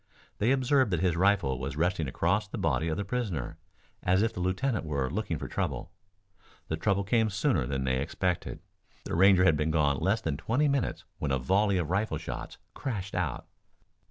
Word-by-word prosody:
They 110 - +2
observed 130 -1 +3
that 85 -4 0
his 90 -3 +2
rifle 90 -8 +2
was 65 +1 -4
resting 85 -2 0
across 95 +10 0
the - - -6
body 80 - 0
of 80 - -1
the 100 - -2
prisoner, 100 - -3 0.4
as 95 +3 +3
if 115 - 0
the - - -6
lieutenant 95 +7 0
were 70 -4 -2
looking 95 -3 -2
for - - -5
trouble. - - -3 0.8
The 80 - 0
trouble 100 +4 +1
came 110 +2 +2
sooner 95 -10 +1
than 65 -1 -2
they 65 0 +1
expected. 90 +5 -2 0.4
The - - -5
Ranger 95 +1 +6
had 80 -4 +5
been 75 +2 0
gone 75 -3 +2
less 100 +4 +1
than 75 -9 -2
twenty 135 - +1
minutes 140 -2 -1
when 75 - -2
a 65 - +2
volley 95 +9 +2
of 85 -2 -2
rifle 100 -4 0
shots 80 - -6 0.2
crashed 100 -8 -4
out. - - -2
95 Hz, 190 wpm, -29 LUFS, 75-105 Hz, 0.8 s, Ranger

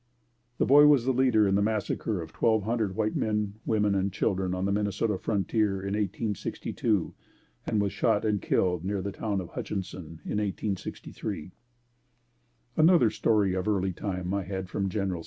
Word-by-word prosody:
The - - +2
boy 145 +2 +7
was 140 -5 +5
the 130 - +2
leader 120 -5 +4
in 95 - +1
the 100 - +3
massacre 105 -2 -1
of 80 - -12
twelve 110 -2 +2
hundred 110 -3 -1
white 110 0 0
men, 105 -1 -1
women 105 -2 +2
and 95 0 0
children 95 -1 0
on 90 +1 -2
the 100 - +1
Minnesota 105 +1 0
frontier 105 0 0
in 100 +1 -3
1862 105 -1 -1 0.5
and 105 - +1
was 100 -1 0
shot 105 - +1
and 105 -2 +1
killed 90 -2 +1
near 100 0 -2
the 100 - -3
town 100 -1 -2
of 90 -2 -6
Hutchinson 90 -5 -6
in 105 - -1
1863. 100 -4 -4 1.2
Another 160 -7 +5
story 105 -4 +2
of 95 +2 -2
early 95 -3 +1
time 90 0 -3
I 100 - 0
had 95 0 -5
from 95 +1 -1
Genl. 95 -3 -2
100 Hz, 170 wpm, -28 LUFS, 95-110 Hz, 1.2 s, boy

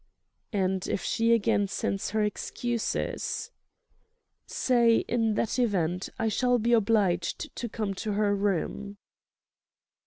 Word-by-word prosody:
"And 190 -3 0
if - - -2
she 230 +1 +1
again 205 -3 +3
sends 195 0 -2
her 215 0 +1
excuses?" 230 +3 -2 1.0
"Say, 235 -3 +3
in 225 -2 +1
that 230 +3 -1
event, 185 -6 0
I 225 - 0
shall 245 +3 +2
be 235 +1 +1
obliged 200 -6 +1
to 240 - -4
come 210 -2 -3
to 215 - -2
her 205 0 +2
room." 200 +1 -2
210 Hz, 120 wpm, -28 LUFS, 195-230 Hz, 1.0 s, again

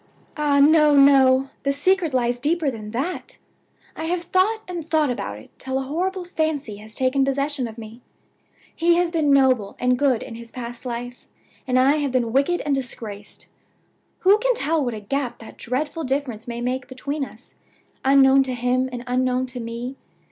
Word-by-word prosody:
"Ah, 295 -2 +2
no! 300 0 +6
no! 270 -1 +5
the 275 - 0
secret 335 +4 +1
lies 245 -1 0
deeper 305 +1 +1
than 215 -3 -8
that! 270 +11 -4 0.6
I 320 - -5
have 345 +1 -1
thought 385 +6 +1
and 350 -2 -5
thought 310 -3 +1
about 100 - -4
it 110 - -15
till 265 0 -3
a 270 - -1
horrible 360 +6 -2
fancy 310 -10 -2
has 215 +1 -10
taken 260 +1 +1
possession 275 -1 -1
of 225 0 -10
me. 225 +2 -10 0.7
He 340 0 +3
has 350 -1 +1
been 310 -4 +1
noble 255 -7 +3
and 250 0 +1
good 265 -5 +2
in 240 - -9
his 230 0 -10
past 240 0 -7
life, 245 +1 -6 0.4
and 255 0 +2
I 270 +4 +4
have 285 -3 -1
been 240 -3 0
wicked 280 +7 +2
and 290 - -1
disgraced. 225 -6 -6 0.8
Who 395 +3 +5
can - - +1
tell 315 -3 +1
what 245 -3 -2
a - - -6
gap 255 +4 -3
that 225 - -12
dreadful 290 +6 -3
difference 260 -5 -3
may 235 0 -5
make 250 +1 -2
between 280 +3 -4
us, 245 -2 -11 0.5
unknown 270 0 +6
to 260 -2 -1
him 250 +1 0
and 245 -1 -6
unknown 255 0 0
to 250 -1 -6
me? 235 +3 -6
265 Hz, 185 wpm, -23 LUFS, 245-300 Hz, 0.8 s, no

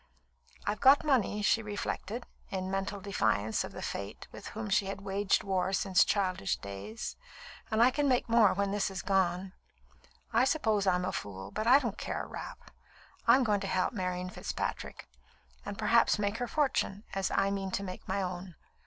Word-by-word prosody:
"I've 205 +1 -1
got 280 +2 +7
money," 225 -7 +2
she 225 - +3
reflected, 210 +2 -4 0.2
in 185 -1 -3
mental 195 +1 -2
defiance 110 - 0
of - - -7
the - - -7
Fate 100 0 -5
with - - -9
whom 220 0 -5
she 200 -1 +2
had 195 0 -5
waged 200 0 +1
war 190 -1 0
since 190 -1 +4
childish 185 - 0
days, 100 - -6 0.5
"and 220 0 +4
I 250 - +6
can 290 +2 +1
make 250 -1 +2
more 230 -3 +5
when 200 0 0
this 205 0 0
is 190 -1 -5
gone. 190 -1 +1 0.8
I 230 +2 +5
suppose 220 -8 +1
I'm 180 -1 +2
a 185 - -1
fool, 95 -1 -6
but 215 - -2
I 255 +3 +9
don't 235 -7 -3
care - - -3
a - - -8
rap. - - -9 0.6
I'm 265 - +6
going 210 -3 +2
to 195 - -4
help 185 +3 0
Marian 180 -3 -3
Fitzpatrick, - - -4 0.6
and 205 0 -6
perhaps 225 +1 +4
make 205 +1 -1
her 245 - -2
fortune, 265 -8 0
as 195 -1 0
I 195 0 +1
mean 195 -1 -2
to 195 - -2
make 185 -1 -7
my 195 +1 0
own. 180 -1 -5
200 Hz, 185 wpm, -31 LUFS, 185-220 Hz, 0.8 s, I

